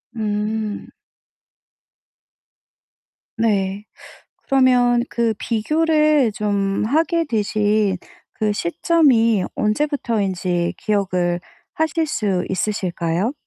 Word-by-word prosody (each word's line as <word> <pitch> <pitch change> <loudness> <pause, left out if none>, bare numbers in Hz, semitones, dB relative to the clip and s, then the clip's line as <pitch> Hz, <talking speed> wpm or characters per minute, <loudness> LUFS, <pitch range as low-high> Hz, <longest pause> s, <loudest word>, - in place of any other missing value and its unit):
음. 215 0 -3 2.5
네. 205 -2 0 0.6
그러면 250 -3 +3
그 235 -2 0
비교를 305 +3 +2
좀 200 -1 -1
하게 325 +6 +1
되신 210 -4 +1 0.4
그 215 -1 -1
시점이 230 - +2
언제부터인지 205 - -1
기억을 185 -6 0 0.3
하실 320 +1 0
수 205 -11 -1
있으실까요? 185 +1 -1
215 Hz, 155 characters per minute, -20 LUFS, 195-255 Hz, 2.5 s, 그러면